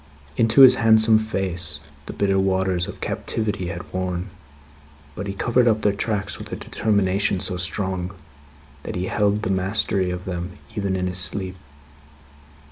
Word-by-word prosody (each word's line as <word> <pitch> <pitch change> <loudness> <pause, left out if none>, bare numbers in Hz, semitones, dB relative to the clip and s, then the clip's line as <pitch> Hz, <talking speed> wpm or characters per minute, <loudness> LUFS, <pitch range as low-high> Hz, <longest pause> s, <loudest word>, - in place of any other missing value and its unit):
Into 115 +4 +4
his 130 -1 +10
handsome 110 -1 +5
face, 90 -8 -2 0.3
the - - -5
bitter 100 -1 +1
waters 95 -2 +1
of - - -8
captivity 105 -5 -2
had 90 -1 -7
worn; 90 0 -2 0.8
but, 100 +6 -5
he 100 - -3
covered 120 +4 +2
up 110 -1 +2
their 105 - +3
tracks 100 0 -2
with - - -9
a - - -2
determination 100 -2 0
so 90 - -3
strong, 90 0 -3 0.7
that - - -6
he 90 0 -2
held 105 +1 +1
the 105 - 0
mastery 95 0 0
of 90 +1 -5
them 90 -1 -4 0.2
even 100 -2 -1
in 90 -1 -1
his 90 0 -1
sleep. 95 +1 -1
95 Hz, 155 wpm, -23 LUFS, 90-105 Hz, 0.8 s, his